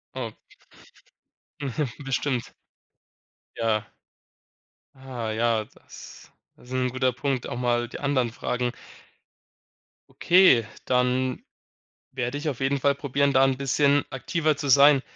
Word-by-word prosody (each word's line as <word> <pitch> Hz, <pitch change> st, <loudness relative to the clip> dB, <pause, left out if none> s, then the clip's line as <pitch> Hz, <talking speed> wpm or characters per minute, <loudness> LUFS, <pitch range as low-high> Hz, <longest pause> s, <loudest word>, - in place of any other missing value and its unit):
Oh. 120 Hz, -4 st, -4 dB, 1.3 s
Mhm. 140 Hz, +1 st, -2 dB, 0.2 s
Bestimmt. 135 Hz, -2 st, -2 dB, 1.0 s
Ja. 110 Hz, -2 st, 0 dB, 1.1 s
Ah, 130 Hz, -4 st, -6 dB
ja, 115 Hz, 0 st, +1 dB
das -, -, -14 dB, 0.3 s
ist 125 Hz, -, -14 dB
'n 130 Hz, 0 st, 0 dB
guter 130 Hz, 0 st, 0 dB
Punkt, 130 Hz, 0 st, -2 dB
auch 120 Hz, -, -4 dB
mal 120 Hz, -1 st, 0 dB
die -, -, -8 dB
anderen 130 Hz, -5 st, 0 dB
fragen. 125 Hz, +1 st, -2 dB, 1.4 s
Okay, 175 Hz, -, +5 dB, 0.2 s
dann 125 Hz, 0 st, +1 dB, 0.7 s
werde 130 Hz, +1 st, -3 dB
ich 150 Hz, -, -5 dB
auf 135 Hz, -3 st, -3 dB
jeden 140 Hz, +1 st, +1 dB
Fall 140 Hz, +1 st, +2 dB
probieren, 140 Hz, 0 st, 0 dB
da 135 Hz, 0 st, +5 dB
'n 135 Hz, -1 st, +2 dB
bisschen 140 Hz, +1 st, +2 dB
aktiver 150 Hz, +3 st, -1 dB
zu 140 Hz, 0 st, -4 dB
sein. 140 Hz, +1 st, +7 dB
130 Hz, 120 wpm, -25 LUFS, 120-140 Hz, 1.4 s, sein